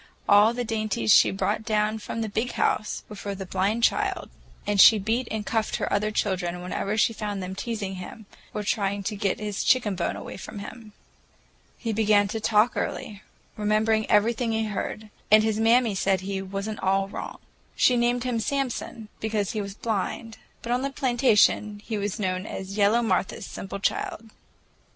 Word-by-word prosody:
All 205 +2 +6
the 245 - -1
dainties 215 - +1
she - - +7
brought 195 +2 -1
down 215 0 0
from 225 +2 -5
the 220 - -1
"Big 225 +4 -2
House" 210 - 0
were 210 - -9
for 200 0 -5
the 190 0 -6
blind 195 +5 -1
child, - - +1 0.3
and 205 -2 +4
she 220 - +9
beat 225 +5 -1
and 215 -1 -3
cuffed 220 -1 -1
her - - -2
other 210 +1 +1
children 185 -4 -1
whenever 200 +3 -2
she 230 - +3
found 205 -3 -4
them 185 +1 -5
teasing 200 -2 -4
him 195 +4 -9 0.3
or 210 - -4
trying 200 -1 -1
to 210 +2 -3
get 200 -2 -1
his 210 -2 -3
chicken 240 -6 +3
bone 175 -2 -2
away - - -8
from 210 - -9
him. 210 +1 -9 0.8
He 230 -3 -3
began 210 -1 +3
to 225 - -3
talk 220 +2 +3
early, 205 -1 -4 0.3
remembered 215 +1 +1
everything 225 +2 +2
he 220 0 0
heard, 215 +1 -5 0.2
and 215 0 +7
his 220 -1 0
mammy 230 0 +4
said 195 0 +1
he 190 0 -3
"was 195 +2 -5
n't 215 -1 -5
all 195 +1 +1
wrong." - - -7 0.4
She 250 - +4
named 240 0 +1
him 245 -2 -1
Samson, 240 -3 -3
because 215 -2 -1
he 215 - -2
was 200 -1 -7
blind, 225 +1 -3 0.2
but 235 - -4
on 245 +1 +1
the 275 - -1
plantation 240 -6 +2
he 220 -3 -3
was 205 0 -3
known 185 0 -2
as 195 +1 -6
"yellow 215 +3 +3
Martha's 220 -4 -1
simple 195 +1 -6
child." 220 +2 -2
215 Hz, 185 wpm, -25 LUFS, 200-225 Hz, 0.8 s, she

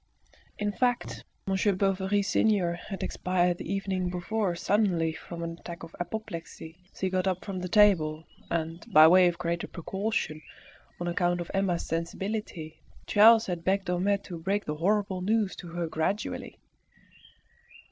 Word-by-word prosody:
In 210 0 -1
fact, 245 +2 -1 0.2
Monsieur 195 +1 +2
Bovary 195 +1 +1
senior 200 -4 +2
had 190 +3 -6
expired 180 -1 0
the 170 - -5
evening 190 -2 -1
before 180 +1 -1
suddenly 175 -4 +1
from 170 +1 -8
an 165 0 -5
attack 170 -1 -8
of 165 - -10
apoplexy 170 -3 -6
as - - -17
he 190 - +2
got 185 0 0
up 185 0 -1
from 190 -3 -4
table, 180 -5 +3 0.2
and 165 0 -2
by 155 +1 +9
way 180 +2 +7
of 175 -1 -1
greater 170 0 -2
precaution, 190 -3 -3 0.6
on 175 - -3
account 175 0 +1
of 175 - -5
Emma's 195 -3 0
sensibility, 170 -1 -4 0.2
Charles 225 +2 +6
had 175 -3 -4
begged 190 +1 0
Homais 195 +3 +1
to 175 -3 -7
break 200 +4 -1
the 150 0 -3
horrible 195 +1 +1
news 210 +1 +1
to 175 - -8
her 170 0 -3
gradually. 165 +6 -3
180 Hz, 150 wpm, -28 LUFS, 170-200 Hz, 0.6 s, by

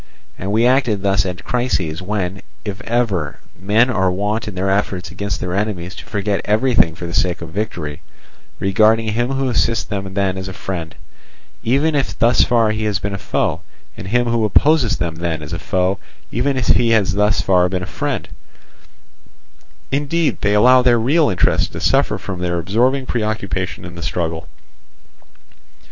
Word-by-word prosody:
And 95 +2 -4
we 110 +3 +3
acted 125 -6 +2
thus 95 -1 +2
at 90 0 -5
crises 95 -11 -1
when, 95 -1 -3 0.2
if 100 0 -5
ever, 110 - 0 0.2
men 110 +7 +3
are 95 -5 +2
wont 105 +5 -1
in 105 - -6
their 95 +1 0
efforts 95 -4 -1
against 100 +3 -3
their 90 -1 -3
enemies 95 -3 -2
to - - -10
forget 100 -1 -1
everything 110 -6 +2
for 85 - -7
the 85 - -6
sake 90 -2 +1
of 85 - -7
victory, 80 -6 -4 0.6
regarding 110 +3 +3
him 120 +4 0
who 135 0 0
assists 115 -3 +1
them 100 -2 -4
then 95 -2 0
as 95 - -5
a 95 - -6
friend, 90 -4 -5 0.7
even 140 +7 +2
if 140 -2 -1
thus 120 +1 +4
far 115 -3 +3
he 110 0 -2
has 105 -2 +1
been 100 +1 -4
a 100 - -4
foe, - - -1 0.3
and - - -8
him 120 +4 +2
who 115 -1 +1
opposes 130 +3 +3
them 85 -2 -3
then 80 -2 -3
as 75 +3 -7
a 80 - -3
foe, 95 +1 0 0.3
even 130 +3 0
if 125 - -1
he 120 -1 +4
has 105 -4 +3
thus 105 +1 +2
far 90 -2 +3
been 90 0 -2
a - - -3
friend; - - -3 1.6
indeed 145 +3 0
they 105 0 +2
allow 125 +4 +6
their 120 -2 +4
real 145 +7 +3
interests 95 - +2
to - - -8
suffer - - +2
from 95 -2 -6
their 90 -1 -1
absorbing 120 +10 +1
preoccupation 105 -6 -2
in 85 - -8
the 85 - -8
struggle. 85 -1 -3
100 Hz, 180 wpm, -19 LUFS, 90-115 Hz, 1.6 s, allow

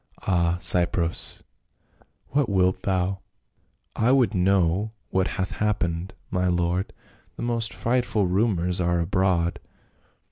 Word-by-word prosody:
— - - -23
Ah, 85 -2 +1
Cypros, 85 -1 +2 0.9
what 140 -4 +1
wilt 95 -1 +2
thou 95 0 -1 0.2
?" - - -44
" - - -39
I - - +5
would 130 -7 +3
know 95 +2 +1 0.2
what 95 -1 +1
hath 95 -1 -2
happened, 95 -4 -1 0.2
my 90 0 0
lord; 90 +1 0 0.4
the - - -6
most 115 -1 -1
frightful 120 -4 0
rumors 90 -2 0
are 85 0 +1
abroad." 85 -1 0
95 Hz, 130 wpm, -24 LUFS, 85-100 Hz, 0.9 s, I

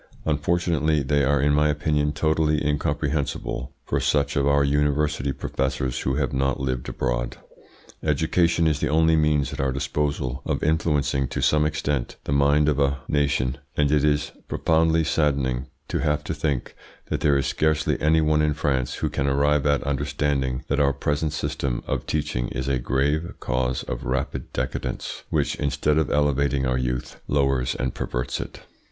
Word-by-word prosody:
Unfortunately 80 0 +1
they 70 +1 +2
are 70 +1 +3
in 70 +1 +3
my 75 +1 +3
opinion 75 0 +1
totally 75 0 +1
incomprehensible 70 -2 -1
for - - 0
such 70 -1 +1
of 70 0 +2
our 70 0 +4
university 75 0 +1
professors 65 -1 -2
who 65 - -1
have - - -1
not 70 0 0
lived 65 -2 -2
abroad. - - -2 0.6
Education 80 +3 +2
is 75 -3 +2
the - - 0
only 80 +1 +4
means 75 -3 +2
at - - -7
our 70 -1 +1
disposal 70 -1 -2
of - - -2
influencing 75 -3 +1
to - - -4
some 75 0 +3
extent 75 -4 -2
the - - -4
mind 70 +1 +3
of 75 -2 +2
a 70 0 +2
nation, 70 -3 0 0.2
and 70 -1 +3
it 75 -1 +3
is 75 -1 +1 0.2
profoundly 80 0 +2
saddening 70 -5 0 0.2
to - - -2
have 75 0 0
to - - -3
think 70 -6 -2 0.4
that - - 0
there 70 -2 +4
is 70 - 0
scarcely 80 -1 +1
any 80 +1 +4
one 75 0 +3
in 75 -1 +1
France 65 -5 0
who - - 0
can 70 - -1
arrive 70 +1 +2
at 70 -1 +2
understanding 70 -2 -1
that 70 - 0
our 70 -1 +3
present 75 +3 -1
system 70 -4 -2
of - - -3
teaching 75 -5 -1
is 65 0 -4
a 70 -2 +1
grave 70 +7 0
cause 65 -1 -1
of - - -5
rapid 65 0 -3
decadence, 65 +1 -4
which - - +1
instead 75 +1 +1
of 80 - 0
elevating 70 -2 +1
our 65 0 +1
youth, 60 -1 -3
lowers 70 -3 +1
and 65 0 -2
perverts 60 0 -3
it. - - -9
70 Hz, 170 wpm, -24 LUFS, 65-75 Hz, 0.6 s, our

